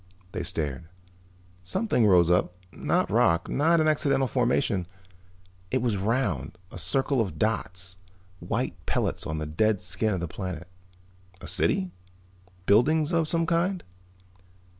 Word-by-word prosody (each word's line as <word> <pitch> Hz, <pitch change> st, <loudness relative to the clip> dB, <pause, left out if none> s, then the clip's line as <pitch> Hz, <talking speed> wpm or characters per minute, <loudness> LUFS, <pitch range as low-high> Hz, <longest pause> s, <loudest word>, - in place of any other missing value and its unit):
They -, -, -3 dB
stared. 75 Hz, 0 st, -3 dB, 0.8 s
Something 125 Hz, -, +1 dB
rose 90 Hz, -3 st, +5 dB
up, 90 Hz, 0 st, +2 dB, 0.2 s
not -, -, 0 dB
rock, 85 Hz, 0 st, +3 dB
not 165 Hz, +4 st, +3 dB
an 155 Hz, -, +3 dB
accidental 140 Hz, -3 st, +2 dB
formation. 120 Hz, -7 st, +1 dB, 0.8 s
It 130 Hz, -1 st, 0 dB
was 115 Hz, -4 st, +1 dB
round, 95 Hz, -, -1 dB
a -, -, -7 dB
circle 135 Hz, -, +2 dB
of 95 Hz, -8 st, -3 dB
dots, 95 Hz, -4 st, -2 dB, 0.4 s
white -, -, -3 dB
pellets -, -, -1 dB
on 80 Hz, -, -3 dB
the 75 Hz, -, -3 dB
dead 100 Hz, +7 st, +1 dB
skin 95 Hz, +4 st, -1 dB
of -, -, -3 dB
the 85 Hz, -, -3 dB
planet. 90 Hz, -1 st, -6 dB, 0.7 s
A -, -, -10 dB
city? 95 Hz, -1 st, 0 dB, 0.7 s
Buildings 150 Hz, -, +4 dB
of 165 Hz, -2 st, +2 dB
some 165 Hz, +1 st, +1 dB
kind? 175 Hz, +2 st, 0 dB
105 Hz, 135 wpm, -27 LUFS, 90-140 Hz, 0.8 s, rose